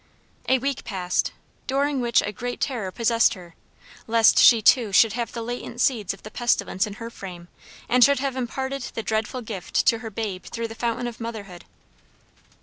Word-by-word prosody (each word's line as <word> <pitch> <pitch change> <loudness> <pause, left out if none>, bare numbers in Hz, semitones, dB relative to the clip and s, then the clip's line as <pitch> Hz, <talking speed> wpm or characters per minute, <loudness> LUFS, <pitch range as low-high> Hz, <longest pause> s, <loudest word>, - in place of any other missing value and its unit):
A 260 - +5
week 275 +1 -3
passed, 180 -4 -1 0.4
during 275 0 0
which 235 -1 +3
a 205 - -3
great 245 +4 -5
terror 235 -9 -2
possessed 230 +2 +2
her, 175 -3 -13 0.5
lest 225 -1 +5
she 235 - +8
too 220 0 +4
should 210 +2 +5
have 235 0 -3
the 230 - -5
latent 240 0 -6
seeds 230 -7 +1
of 195 - -10
the 215 - -9
pestilence 225 -5 0
in 205 - -7
her 230 +2 -8
frame, 175 -5 -9 0.4
and 250 0 +5
should 280 +2 +5
have 270 0 -2
imparted 265 +2 -3
the 225 - -3
dreadful 220 +3 -2
gift 205 -5 -2
to 230 - +3
her 225 -1 -6
babe 205 -3 -5
through 230 -1 -5
the - - -7
fountain 235 +1 -2
of 240 -1 -6
motherhood. 205 -6 -7
230 Hz, 185 wpm, -24 LUFS, 210-245 Hz, 0.5 s, she